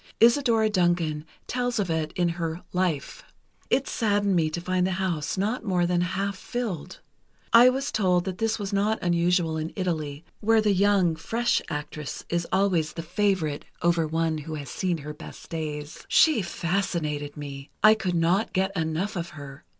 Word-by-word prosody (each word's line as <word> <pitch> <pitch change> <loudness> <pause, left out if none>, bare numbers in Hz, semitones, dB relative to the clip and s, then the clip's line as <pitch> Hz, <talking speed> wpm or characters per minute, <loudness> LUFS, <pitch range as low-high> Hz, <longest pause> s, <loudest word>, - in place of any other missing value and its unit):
Isadora 235 -2 +4
Duncan 175 -6 +1 0.2
tells 245 -1 -1
of 195 -5 0
it 160 -1 -1
in 175 -1 +2
her 170 0 -3
'Life.' 180 -6 -1 0.5
It 275 - +2
saddened 205 -3 +1
me 160 -2 +2
to 155 - -4
find 185 +1 0
the 190 - -1
house 180 -4 -2
not 215 +6 -1
more 180 -4 +1
than 175 0 +1
half 195 +3 -1
filled. 210 -7 -5 0.5
I 240 +2 +9
was 270 +2 -2
told 180 -4 +2
that 185 0 -4
this 225 0 +1
was 200 -2 -4
not 210 +2 +2
unusual 170 -1 +2
in 160 +1 -3
Italy, 160 -5 -3
where 225 +1 +4
the 210 -2 +3
young, 195 -3 +3
fresh 230 +9 0
actress 150 -1 -5
is 170 0 -1
always 185 -5 +2
the 165 - -5
favorite 175 -4 0 0.2
over 170 -2 +2
one 160 0 0
who 155 +1 -6
has 145 -3 -7
seen 180 -2 -1
her 150 0 -7
best 150 - -12
days. 155 -1 -5
She 310 -9 +5
fascinated 170 -5 -2
me. 140 -1 -7
I 215 0 +9
could 185 -5 -2
not 175 +6 +2
get 190 +1 0
enough 165 +5 -1
of 170 -1 -3
her. 140 0 -10
175 Hz, 175 wpm, -26 LUFS, 160-200 Hz, 0.5 s, I